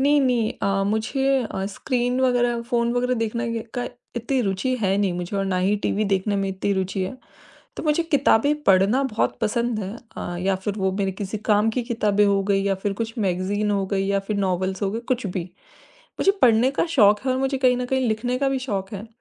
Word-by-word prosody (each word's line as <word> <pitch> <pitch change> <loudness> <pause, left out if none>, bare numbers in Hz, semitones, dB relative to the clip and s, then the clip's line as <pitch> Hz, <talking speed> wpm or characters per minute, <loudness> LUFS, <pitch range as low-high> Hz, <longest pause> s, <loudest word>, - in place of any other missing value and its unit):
नहीं, 290 +2 +4
नहीं 245 -5 +1
अ, 195 0 +1
मुझे 220 +6 -1 0.3
अ, 190 - -2
स्क्रीन 245 0 -1
वग़ैरह, 245 -2 +2
फ़ोन 235 0 0
वग़ैरह 250 +1 +1
देखने 230 0 -2
के 230 - -2
का 245 - -2 0.3
इतनी 245 +3 0
रुचि 200 +6 -1
है 195 -1 +2
नहीं 195 -3 +1
मुझे 180 +3 -4
और 195 - 0
ना 190 -1 0
ही 195 +3 +2
टीवी 215 - +1
देखने 200 +1 0
में 195 0 -1
इतनी 190 +1 -1
रुचि 190 0 -1
है। 185 +7 -4 0.6
तो - - -4
मुझे 305 +2 +2
किताबें 290 -3 +3
पढ़ना 195 +6 +4
बहुत 230 -5 -1
पसंद 235 +1 0
है। 200 +1 -5 0.2
अ, 175 - -4
या 190 +1 +1
फिर 190 +2 -3
वो 190 -1 0
मेरे 195 -1 0
किसी 200 +2 -5
काम 210 +2 +4
की 245 +2 -2
किताबें 210 -4 +1
हो 200 -1 +2
गई 195 0 +1
या 195 -1 +1
फिर 200 -1 0
कुछ 230 +1 -5
मैगज़ीन 200 +2 0
हो 200 -1 0
गई 195 0 -1
या 200 0 +1
फिर 210 -2 -1
नॉवेल्स 190 0 -1
हो 195 - 0
गए 225 - -3
कुछ 245 -2 -6
भी। 180 -2 -3 0.8
मुझे 390 - +4
पढ़ने 235 +2 +5
का 275 - 0
शौक 210 -4 +6
है 260 - +2
और 255 - 0
मुझे 270 0 0
कहीं 255 -1 +3
न 250 - -2
कहीं 260 0 0
लिखने 245 +3 -1
का 275 -1 +2
भी 270 - -1
शौक 200 -7 -3
है। 205 +3 -6
215 Hz, 225 wpm, -23 LUFS, 195-245 Hz, 0.8 s, शौक